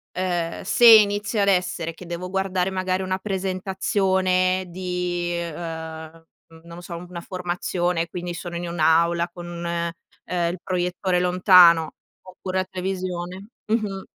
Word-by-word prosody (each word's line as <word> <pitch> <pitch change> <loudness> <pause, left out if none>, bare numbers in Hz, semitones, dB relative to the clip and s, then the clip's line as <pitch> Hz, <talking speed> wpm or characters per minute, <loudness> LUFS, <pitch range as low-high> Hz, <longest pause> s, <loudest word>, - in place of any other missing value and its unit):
Ehm, 175 -2 -2
se 240 - +3
inizio 210 -1 +6
ad 200 - +2
essere 180 -3 0
che 180 - -11
devo 175 +1 -5
guardare 190 -1 0
magari 185 0 -1
una 185 0 -1
presentazione 190 -1 0
di, 180 -1 -3
ehm, 165 -1 -6 0.3
n - - -14
non 170 0 -11
lo - - -9
so, 175 -1 -7
una 175 0 -8
formazione 175 -1 -2
quindi 175 0 -5
sono 175 0 -7
in 175 0 -4
un'aula 170 +1 +2
con, 175 0 -7
ehm, 170 0 -3
il 180 - -7
proiettore 180 0 -1
lontano 180 -3 +6 0.3
oppure 185 0 -6
la 185 - -1
televisione 185 0 -4 0.2
mh-mh, 210 -3 -1
180 Hz, 135 wpm, -23 LUFS, 170-185 Hz, 0.3 s, inizio